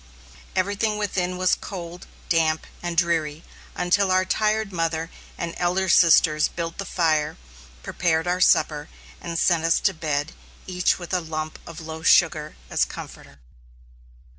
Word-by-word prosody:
Everything 200 +3 0
within 185 -3 -2
was 185 0 +2
cold, 175 -2 -6 0.2
damp, 160 -1 +1 0.2
and 175 -1 -4
dreary, 165 -2 0 0.3
until 190 +2 +2
our 185 0 +3
tired 215 +1 0
mother 165 -1 -2 0.3
and 170 -1 -4
elder 180 +2 0
sisters 160 -3 +5
built 165 +1 -5
the 195 - -3
fire, 155 -2 +1 0.5
prepared 165 -2 0
our 180 +1 -1
supper, 150 -3 +3 0.3
and 170 -1 -4
sent 170 -2 +2
us 165 0 +3
to 195 - +1
bed, 155 -2 -2 0.3
each 180 -1 +1
with 175 0 -8
a 180 - +2
lump 155 -1 -5
of 165 0 -9
loaf 160 0 -5
sugar 155 -3 +3
as - - +1
comforter. 70 - -8
170 Hz, 140 wpm, -24 LUFS, 160-185 Hz, 0.5 s, sisters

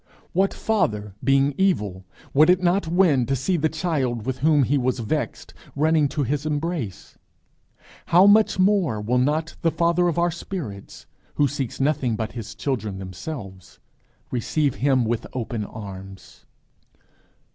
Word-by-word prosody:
What 195 +2 +2
father 105 - -1
being 135 +2 +3
evil 105 - 0 0.3
would 155 +4 +5
it 180 0 +4
not 180 0 +2
win 160 -8 +3
to 135 - +1
see 135 +9 0
the 160 -1 +1
child 140 - -2
with 130 -1 -3
whom 150 0 +4
he 130 +4 +1
was 130 -2 0
vexed 115 -3 -3 0.2
running 155 0 +3
to 145 +1 -2
his 140 +2 -1
embrace? 150 - -4 0.9
how 180 +3 +6
much 210 +1 +5
more 185 - +2
will 120 +4 0
not 155 +5 0
the 165 - +3
Father 170 +2 +2
of 170 - -1
our 170 0 +2
spirits, 155 - -7 0.3
who 145 - +3
seeks 135 -3 -4
nothing 135 -4 +1
but 110 0 -3
his 110 -3 -7
children 110 -4 -3
themselves, 95 - -8 0.5
receive 135 +3 0
him 130 -3 +3
with 115 0 -2
open 115 -3 -3
arms! 95 - -10
140 Hz, 145 wpm, -23 LUFS, 110-165 Hz, 0.9 s, how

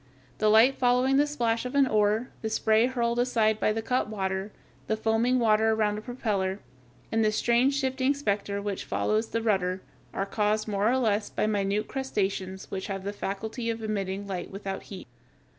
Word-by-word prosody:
The 215 - +3
light 225 +5 +5
following 255 +2 +3
the 290 +1 +4
splash 235 -6 0
of 250 +2 -5
an 280 -1 +5
oar, 215 0 +1
the 220 - -2
spray 220 +1 +3
hurled 235 -2 -1
aside 225 -3 +2
by 215 - +2
the 225 +1 -2
cut 250 -1 0
water, 190 -1 -3 0.4
the 220 - 0
foaming 225 +3 +2
water 220 -2 +3
around 210 -1 0
a - - -9
propeller, 205 -6 -2 0.5
and 225 0 +2
the 215 - +3
strange 240 +5 +2
shifting 265 0 +1
specter 200 -6 -1
which 200 -2 -3
follows 215 +1 0
the 230 - -2
rudder, 190 -4 0 0.3
are 195 - -2
caused 210 +1 0
more 205 +1 +1
or 255 - +2
less 215 -4 +1
by - - -1
minute 205 0 0
crustaceans 195 -8 -3
which 190 0 -4
have 195 -2 -4
the 200 +1 -3
faculty 220 +4 -4
of 225 0 -3
emitting 200 -2 -3
light 185 -3 -5
without 195 0 -5
heat. 190 -8 -9
215 Hz, 185 wpm, -27 LUFS, 200-240 Hz, 0.5 s, light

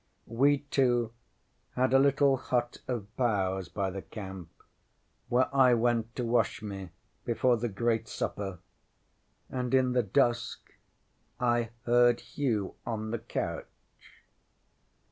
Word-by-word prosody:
We 140 +5 +2
two 120 -4 +2 0.6
had 130 +1 +2
a 135 - +7
little 140 0 +4
hut 120 -1 -2
of 110 -4 -4
boughs 95 -6 0
by 95 -2 -2
the 95 +1 -5
camp, 95 -5 -8 0.8
where 125 +2 +3
I 130 -2 +6
went 115 0 0
to 125 - -2
wash 115 -2 +1
me 95 -3 -6 0.3
before 120 +1 +2
the 120 +1 -2
great 115 +2 0
supper, 95 -2 -4 0.9
and 125 0 -1
in 130 -1 +3
the 125 0 +3
dusk 115 +2 0 0.7
I 120 -2 +1
heard 120 0 +4
Hugh 115 -9 -2
on 110 -1 -3
the 115 - -2
couch. 115 - -4
120 Hz, 125 wpm, -30 LUFS, 105-125 Hz, 0.9 s, a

